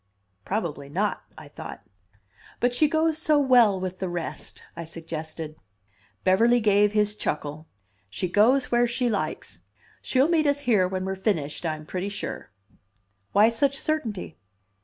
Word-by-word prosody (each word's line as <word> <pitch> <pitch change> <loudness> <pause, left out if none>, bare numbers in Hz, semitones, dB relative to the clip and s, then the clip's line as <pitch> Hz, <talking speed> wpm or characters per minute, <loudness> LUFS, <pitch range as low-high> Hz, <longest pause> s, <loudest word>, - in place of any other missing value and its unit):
Probably 160 -9 -3
not, 195 +7 -1 0.2
I - - -11
thought. - - -9 0.8
"But 245 0 +1
she 300 +5 +3
goes 315 0 +1
so 310 -1 +3
well 245 -8 +5
with 185 0 -5
the 190 - -2
rest," 175 -1 -6
I 170 - -5
suggested. 160 -1 -6 0.7
Beverly 230 +6 +4
gave 205 -1 +3
his 210 -1 +2
chuckle. 150 -4 -4 0.4
"She 140 - -3
goes 230 +9 +3
where 240 0 +4
she 245 +1 0
likes. 205 - -3 0.4
She'll 265 +2 +2
meet 325 -3 +2
us 285 0 +1
here 215 -9 +3
when 185 0 -3
we're 190 0 -2
finished, 175 -5 -2
I'm 155 -1 -4
pretty 185 +4 -3
sure." 200 - -5 0.8
"Why 210 +3 +6
such 275 +4 +1
certainty?" 230 - -3
205 Hz, 145 wpm, -25 LUFS, 170-245 Hz, 0.8 s, Why